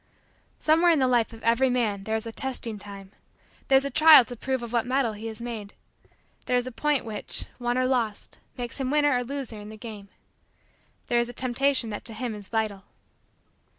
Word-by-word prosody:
Somewhere 325 Hz, +3 st, +4 dB
in 330 Hz, -, +5 dB
the 260 Hz, -2 st, +3 dB
life 240 Hz, -2 st, +2 dB
of 225 Hz, -1 st, -13 dB
every 235 Hz, +3 st, +3 dB
man 215 Hz, -6 st, 0 dB
there 220 Hz, -, -1 dB
is 220 Hz, -, -2 dB
a 230 Hz, -, -5 dB
testing 240 Hz, -4 st, -4 dB
time. 200 Hz, -1 st, -10 dB, 0.6 s
There 270 Hz, -, +4 dB
is 270 Hz, +1 st, +5 dB
a 280 Hz, -, -3 dB
trial 310 Hz, -2 st, +8 dB
to 245 Hz, -, -7 dB
prove 260 Hz, +1 st, -2 dB
of 235 Hz, 0 st, -7 dB
what 235 Hz, 0 st, +1 dB
metal 255 Hz, -3 st, +1 dB
he 215 Hz, +2 st, -7 dB
is 220 Hz, -1 st, -7 dB
made. 225 Hz, -4 st, -6 dB, 0.7 s
There 250 Hz, -, +2 dB
is 245 Hz, -, 0 dB
a 255 Hz, -, -5 dB
point 290 Hz, +1 st, 0 dB
which, 215 Hz, -2 st, -4 dB
won 240 Hz, 0 st, -1 dB
or 255 Hz, -, +2 dB
lost, 240 Hz, -5 st, -1 dB, 0.2 s
makes 245 Hz, +2 st, -5 dB
him 260 Hz, -, -1 dB
winner 290 Hz, -1 st, +3 dB
or 245 Hz, -, 0 dB
loser 255 Hz, -4 st, -5 dB
in 205 Hz, 0 st, -9 dB
the 215 Hz, -, -10 dB
game. 210 Hz, -3 st, -9 dB, 1.0 s
There 240 Hz, -, +2 dB
is 235 Hz, 0 st, 0 dB
a -, -, -7 dB
Temptation 260 Hz, -1 st, 0 dB
that 205 Hz, -, -5 dB
to 225 Hz, -, -3 dB
him 245 Hz, -2 st, -3 dB
is 205 Hz, -2 st, -6 dB
vital. 215 Hz, -4 st, -2 dB
240 Hz, 215 wpm, -26 LUFS, 220-260 Hz, 1.0 s, trial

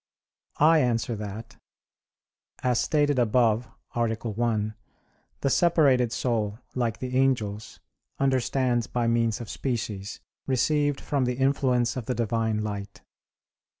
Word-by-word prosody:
I 160 Hz, +2 st, +5 dB
answer 120 Hz, -3 st, 0 dB
that, 105 Hz, +2 st, -7 dB, 1.1 s
As 125 Hz, -2 st, +2 dB
stated 145 Hz, -3 st, +2 dB
above 115 Hz, -1 st, +2 dB, 0.3 s
(A. 120 Hz, -, +1 dB
1), 110 Hz, -1 st, -1 dB, 0.7 s
the 140 Hz, -, +1 dB
separated 140 Hz, -9 st, +3 dB
soul, 110 Hz, -5 st, -1 dB, 0.2 s
like 115 Hz, -3 st, -1 dB
the 125 Hz, 0 st, -4 dB
angels, 115 Hz, -6 st, 0 dB, 0.4 s
understands 130 Hz, -2 st, +1 dB
by 120 Hz, -1 st, -1 dB
means 115 Hz, 0 st, +1 dB
of 120 Hz, -, -7 dB
species, 110 Hz, -7 st, -4 dB, 0.3 s
received 145 Hz, +2 st, +1 dB
from 140 Hz, -3 st, -1 dB
the 125 Hz, 0 st, -1 dB
influence 130 Hz, -3 st, +1 dB
of 120 Hz, -3 st, -5 dB
the 125 Hz, -, -1 dB
Divine 110 Hz, -1 st, 0 dB
light. 100 Hz, -1 st, -6 dB
120 Hz, 115 wpm, -26 LUFS, 110-130 Hz, 1.1 s, I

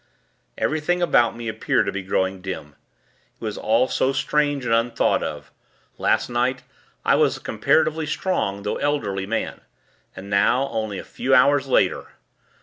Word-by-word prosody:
Everything 155 Hz, +3 st, 0 dB
about 120 Hz, -9 st, +3 dB
me 120 Hz, -1 st, -6 dB
appeared 110 Hz, 0 st, 0 dB
to -, -, -1 dB
be 100 Hz, -, -4 dB
growing 95 Hz, 0 st, -1 dB
dim. 90 Hz, -6 st, -6 dB, 0.6 s
It -, -, -38 dB
was 105 Hz, -, -3 dB
all 115 Hz, +4 st, +2 dB
so 130 Hz, -, +1 dB
strange 145 Hz, 0 st, 0 dB
and 115 Hz, -, +1 dB
unthought 115 Hz, +1 st, +2 dB
of. -, -, -6 dB, 0.5 s
Last -, -, +2 dB
night, 125 Hz, +1 st, -1 dB, 0.4 s
I -, -, +4 dB
was -, -, +3 dB
a -, -, -12 dB
comparatively 155 Hz, 0 st, +1 dB
strong, 100 Hz, -, -1 dB
though 105 Hz, -, -2 dB
elderly 100 Hz, -10 st, -1 dB
man; 115 Hz, +1 st, -3 dB, 0.5 s
and 95 Hz, -, -9 dB
now, 120 Hz, +7 st, +2 dB
only 110 Hz, -3 st, -3 dB
a -, -, -6 dB
few 135 Hz, 0 st, 0 dB
hours 140 Hz, +2 st, +4 dB
later 130 Hz, -, +1 dB
120 Hz, 155 wpm, -23 LUFS, 100-140 Hz, 0.6 s, I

